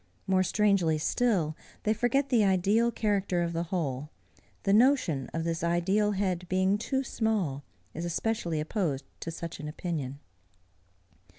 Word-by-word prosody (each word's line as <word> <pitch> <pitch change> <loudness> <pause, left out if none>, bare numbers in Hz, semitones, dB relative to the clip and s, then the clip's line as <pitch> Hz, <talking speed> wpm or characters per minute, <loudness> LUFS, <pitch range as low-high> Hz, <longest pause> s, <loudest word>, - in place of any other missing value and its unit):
More 190 -1 +3
strangely 185 -5 +2
still, 170 -2 +1 0.3
they 215 - +2
forget 245 +5 +1
the 235 -5 +4
ideal 200 +5 +3
character 200 -6 0
of 170 0 -2
the 170 +1 -1
whole: 150 -6 -2 0.5
the 195 - +2
notion 215 - +3
of 165 - -2
this 165 0 -2
ideal 190 +5 +2
head 185 -3 -1
being 190 +2 +2
too 265 +4 -1
small, 205 - -1 0.3
is 165 - -5
especially 175 -1 -1
opposed 155 -4 -1
to - - -5
such 165 0 -6
an 150 - -5
opinion. 150 -4 -4
185 Hz, 140 wpm, -29 LUFS, 165-210 Hz, 0.5 s, the